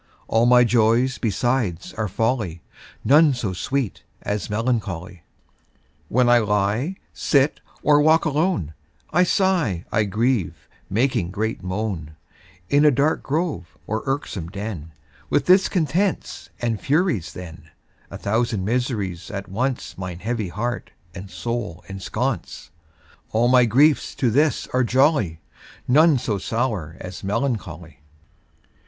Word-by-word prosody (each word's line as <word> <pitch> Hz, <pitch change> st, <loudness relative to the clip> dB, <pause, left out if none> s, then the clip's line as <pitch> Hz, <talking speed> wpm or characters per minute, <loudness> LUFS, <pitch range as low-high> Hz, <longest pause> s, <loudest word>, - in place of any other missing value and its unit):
All 115 Hz, +2 st, +3 dB
my 125 Hz, 0 st, +7 dB
joys 120 Hz, +2 st, +2 dB
besides 110 Hz, -4 st, -1 dB
are 110 Hz, -1 st, -2 dB
folly, 105 Hz, -4 st, -1 dB, 0.4 s
None 150 Hz, 0 st, +5 dB
so 105 Hz, -6 st, -3 dB
sweet 135 Hz, +4 st, -2 dB, 0.2 s
as 105 Hz, -2 st, -3 dB
melancholy. 105 Hz, -6 st, -2 dB, 0.9 s
When 125 Hz, +1 st, +3 dB
I 120 Hz, 0 st, +6 dB
lie, 105 Hz, -, 0 dB, 0.2 s
sit, 140 Hz, 0 st, +2 dB, 0.2 s
or 145 Hz, 0 st, +5 dB
walk 160 Hz, +2 st, +4 dB
alone, 150 Hz, -, 0 dB, 0.4 s
I 175 Hz, -, +3 dB
sigh, 175 Hz, -, +1 dB
I 105 Hz, -1 st, +2 dB
grieve, 110 Hz, 0 st, -1 dB, 0.2 s
making 110 Hz, -5 st, +1 dB
great 110 Hz, +4 st, -3 dB
moan, 95 Hz, -5 st, -4 dB, 0.5 s
In 145 Hz, +6 st, +3 dB
a 150 Hz, -, +7 dB
dark 145 Hz, +3 st, +1 dB
grove, 135 Hz, -, -3 dB
or 110 Hz, +5 st, -2 dB
irksome 125 Hz, -, -3 dB
den, 100 Hz, -5 st, -6 dB, 0.4 s
With 145 Hz, -, +1 dB
discontents 185 Hz, 0 st, +1 dB
and 115 Hz, -4 st, -2 dB
Furies 145 Hz, -, 0 dB
then, 80 Hz, -3 st, -10 dB, 0.4 s
A -, -, -7 dB
thousand 110 Hz, -2 st, -1 dB
miseries 105 Hz, -7 st, -2 dB
at 100 Hz, -1 st, -6 dB
once 125 Hz, +2 st, -3 dB
Mine 90 Hz, -2 st, -5 dB
heavy 110 Hz, +1 st, -3 dB
heart 120 Hz, +6 st, -3 dB, 0.2 s
and 95 Hz, +1 st, -9 dB
soul 115 Hz, -7 st, -4 dB
ensconce, 95 Hz, 0 st, -4 dB, 0.6 s
All 115 Hz, +2 st, +3 dB
my 125 Hz, -1 st, +6 dB
griefs 140 Hz, +7 st, +3 dB
to 125 Hz, -4 st, +1 dB
this 145 Hz, +5 st, +2 dB
are 130 Hz, 0 st, +3 dB
jolly, 125 Hz, -, +2 dB, 0.5 s
None 150 Hz, +3 st, +5 dB
so 105 Hz, -4 st, -2 dB
sour 105 Hz, -, -2 dB
as 90 Hz, 0 st, -8 dB
melancholy. 95 Hz, -, -3 dB
115 Hz, 125 wpm, -22 LUFS, 95-135 Hz, 0.9 s, my